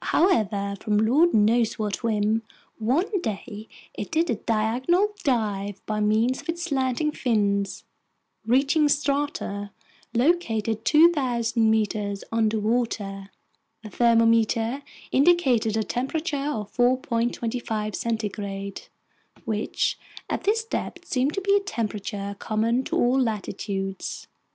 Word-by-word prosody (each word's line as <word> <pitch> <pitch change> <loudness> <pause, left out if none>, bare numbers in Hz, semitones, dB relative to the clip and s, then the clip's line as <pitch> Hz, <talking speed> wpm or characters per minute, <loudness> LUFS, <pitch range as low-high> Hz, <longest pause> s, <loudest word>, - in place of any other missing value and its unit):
However, 210 - +2
from 210 -2 0
lord 270 +11 +4
knows 220 +2 +3
what 210 -2 -2
whim, 220 -1 +1 0.4
one 335 - 0
day 215 - -5 0.3
it - - -6
did 325 +1 +1
a - - +1
diagonal 240 - +1
dive 205 -6 -1
by 215 -1 -2
means 220 +5 +2
of - - -15
its 340 +1 -2
slanting 275 -1 0
fins, 200 -7 0 0.6
reaching 275 +6 +3
strata 280 -8 -1 0.5
located 230 -6 +1
2,000 250 -8 +3
meters 210 -2 0
underwater. 220 -3 -1 0.5
The 215 - -9
thermometer 230 +1 +3 0.3
indicated 265 -8 +3
a 220 - +1
temperature 285 - -2
of 215 -8 -4
4.25 245 -1 0
degrees 215 -2 -3
centigrade, 200 - -3 0.6
which 215 -1 -1 0.3
at - - -3
this 440 +2 +2
depth 355 -5 -5
seemed 270 -1 0
to 390 - -1
be 400 +1 +3
a - - +5
temperature 210 - -4
common 230 +3 0
to - - -2
all 250 +2 +3
latitudes. 195 -3 -3
230 Hz, 115 wpm, -25 LUFS, 210-270 Hz, 0.6 s, a